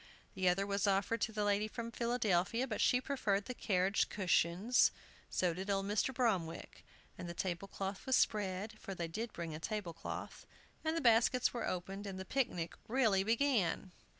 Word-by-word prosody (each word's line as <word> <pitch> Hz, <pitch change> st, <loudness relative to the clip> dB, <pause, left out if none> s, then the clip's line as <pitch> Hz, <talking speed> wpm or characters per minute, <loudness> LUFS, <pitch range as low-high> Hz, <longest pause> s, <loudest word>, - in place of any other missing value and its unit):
The 185 Hz, -1 st, +2 dB
other 195 Hz, +3 st, +1 dB
was 200 Hz, 0 st, 0 dB
offered 200 Hz, +3 st, +1 dB
to 220 Hz, -, 0 dB
the 210 Hz, -1 st, -1 dB
lady 205 Hz, +1 st, +2 dB
from 230 Hz, +1 st, -6 dB
Philadelphia, 230 Hz, -1 st, +1 dB
but 220 Hz, -5 st, -3 dB
she 250 Hz, -, +4 dB
preferred 215 Hz, -7 st, 0 dB
the 250 Hz, -, -4 dB
carriage 195 Hz, -3 st, +1 dB
cushions; 190 Hz, +4 st, +3 dB, 0.4 s
so 180 Hz, -2 st, +1 dB
did 190 Hz, +4 st, -5 dB
old 195 Hz, -1 st, +1 dB
Mr. 210 Hz, +5 st, +1 dB
Bromwick. 210 Hz, -10 st, -1 dB, 0.4 s
And 175 Hz, -, -5 dB
the 170 Hz, -, -6 dB
table 180 Hz, +1 st, -2 dB
cloth 195 Hz, +4 st, -5 dB
was 260 Hz, -, +4 dB
spread, 210 Hz, 0 st, 0 dB
for 195 Hz, -, -6 dB
they 170 Hz, -2 st, -3 dB
did 220 Hz, +7 st, -4 dB
bring 165 Hz, -2 st, -5 dB
a 155 Hz, -, -5 dB
table 205 Hz, -1 st, -3 dB
cloth, 165 Hz, -, -7 dB, 0.4 s
and 320 Hz, +1 st, 0 dB
the -, -, 0 dB
baskets 235 Hz, 0 st, +4 dB
were 240 Hz, -, -2 dB
opened, 195 Hz, +3 st, -4 dB
and 190 Hz, -1 st, -5 dB
the 190 Hz, -, -5 dB
picnic 180 Hz, -10 st, -1 dB
really 220 Hz, -6 st, +3 dB
began. 225 Hz, -5 st, +1 dB
200 Hz, 180 wpm, -35 LUFS, 185-230 Hz, 0.4 s, she